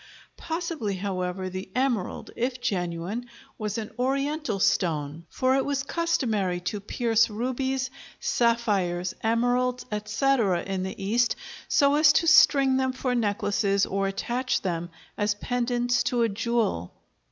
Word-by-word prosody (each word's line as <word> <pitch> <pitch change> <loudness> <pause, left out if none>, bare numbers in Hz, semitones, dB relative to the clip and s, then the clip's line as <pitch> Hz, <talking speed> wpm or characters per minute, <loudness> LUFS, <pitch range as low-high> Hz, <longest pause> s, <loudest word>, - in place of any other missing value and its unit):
Possibly, 325 - -3
however, 185 -1 -3
the 185 +1 -6
emerald, 250 -7 -1
if 250 +1 -2
genuine, 190 +1 -2 0.3
was 210 -1 -2
an 225 0 -5
Oriental 275 -2 -1
stone, 165 -5 0
for 260 0 +1
it 270 - +2
was 280 -1 -1
customary 225 - 0
to 190 +4 -3
pierce 230 +2 +1
rubies, 260 +4 -2 0.3
sapphires, 200 -7 +1
emeralds, 245 +2 +1
etc., 210 -2 +1
in 195 -1 -3
the 190 +1 -5
East 225 +4 +1 0.3
so 280 -1 +4
as 300 0 +6
to - - +2
string 275 -4 +6
them 260 -1 0
for 255 -1 -1
necklaces 205 -3 +1
or 195 0 -1
attach 240 +6 -1
them 175 -2 -2 0.3
as 205 0 +1
pendants 245 +1 0
to 240 -2 +1
a 230 - +2
jewel. 220 - -1
230 Hz, 130 wpm, -26 LUFS, 195-255 Hz, 0.3 s, as